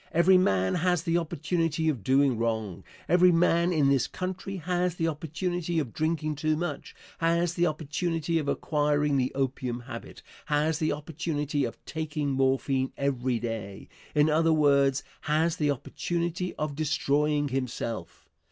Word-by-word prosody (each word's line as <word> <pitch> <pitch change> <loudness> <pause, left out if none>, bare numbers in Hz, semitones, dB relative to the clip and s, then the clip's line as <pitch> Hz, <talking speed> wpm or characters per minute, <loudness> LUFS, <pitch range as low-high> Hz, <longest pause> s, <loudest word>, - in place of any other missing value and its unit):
Every 180 +3 +5
man 95 - +2
has 180 -1 +1
the 170 0 +2
opportunity 165 0 -1
of 135 -10 0
doing 135 +2 +3
wrong. 110 -5 -2 0.2
Every 180 +1 +5
man, 170 +1 +3
in 150 -5 +3
this 135 -3 +2
country, 185 +1 -5
has 180 +1 -1
the 165 -2 0
opportunity 165 +3 -2
of 140 -8 -1
drinking 155 -1 -1
too 155 +1 +1
much, 170 -3 -4 0.2
has 170 +1 +2
the 175 0 +2
opportunity 160 +1 -1
of 150 - -4
acquiring 150 -1 +1
the 130 -1 +1
opium 130 -2 -2
habit, 120 -1 -9 0.2
has 150 +2 +1
the 155 -2 +1
opportunity 150 -1 -2
of 115 - -6
taking 155 -2 -3
morphine 135 0 +1
every 130 -3 0
day 110 -4 -5 0.3
in 150 0 +5
other 160 +1 +3
words, 140 -3 +3 0.3
has 160 +3 +2
the 150 -3 +1
opportunity 170 +5 -2
of 150 -1 -3
destroying 150 -1 +1
himself. 120 -7 -4
150 Hz, 145 wpm, -28 LUFS, 135-165 Hz, 0.3 s, Every